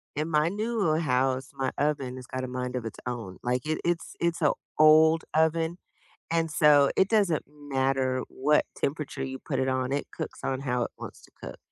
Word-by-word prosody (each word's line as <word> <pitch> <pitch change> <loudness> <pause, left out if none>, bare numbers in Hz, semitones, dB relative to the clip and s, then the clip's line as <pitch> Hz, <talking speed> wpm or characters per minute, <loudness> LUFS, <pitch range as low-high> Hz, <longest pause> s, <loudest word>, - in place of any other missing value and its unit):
in 155 +2 -2
my 155 +1 +2
newer 205 -6 0
house, 130 -2 0
my 135 -1 -2
oven 140 -4 -1
has 130 - -9
got 130 0 -4
a - - -3
mind 125 0 -4
of 125 -2 -3
its 115 - -7
own. 115 -7 -5
Like, 125 +3 -1
it 155 0 -1
it's 175 -1 -1
it's 170 0 0
a 150 - +4 0.3
old 155 +1 +6
oven, 160 +2 +1 0.5
and 165 -1 +1
so, 150 -2 +5
it 190 - +3
doesn't 200 -8 +2
matter 135 -3 -1
what 150 +3 +2
temperature 145 -2 -3
you 130 0 -5
put 135 -4 -3
it 130 - +1
on. 130 0 -1
It 140 +1 -1
cooks - - -5
on 135 0 -2
how 125 -3 0
it - - -5
wants - - -9
to - - -18
cook. - - -7
145 Hz, 200 wpm, -27 LUFS, 130-160 Hz, 0.5 s, old